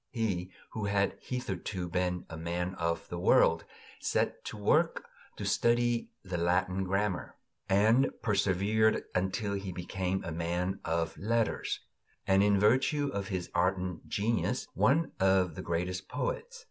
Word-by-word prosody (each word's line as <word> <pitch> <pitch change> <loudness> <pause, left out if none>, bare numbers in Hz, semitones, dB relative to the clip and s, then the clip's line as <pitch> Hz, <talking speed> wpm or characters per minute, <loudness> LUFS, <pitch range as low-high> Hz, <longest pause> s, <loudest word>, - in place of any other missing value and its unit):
He, 100 -7 -1 0.2
who 110 -2 -3
had 100 -1 +1
hitherto 95 -6 -4
been 90 0 -1
a 80 - -8
man 85 +3 -2
of 85 -1 -1
the 85 - -4
world, - - +4 0.3
set - - 0
to - - -5
work - - +2 0.3
to - - -5
study 120 0 +2
the 95 -3 -3
Latin 90 +2 +1
grammar, 95 0 -1 0.3
and 110 +7 +4
persevered 105 +1 +2
until 95 +3 0
he 100 -1 -3
became 90 +1 -2
a 85 - -4
man 85 +3 -1
of 80 0 -1
letters, 115 +2 0 0.4
and, 95 0 +4
in 100 -1 +4
virtue 130 +7 +3
of 100 -1 -2
his 90 -3 -4
ardent 90 0 0
genius, 110 +3 0
one 135 - +3
of 95 -2 +3
our - - -5
greatest 90 +2 -2
poets. - - -3
95 Hz, 140 wpm, -31 LUFS, 90-110 Hz, 0.4 s, world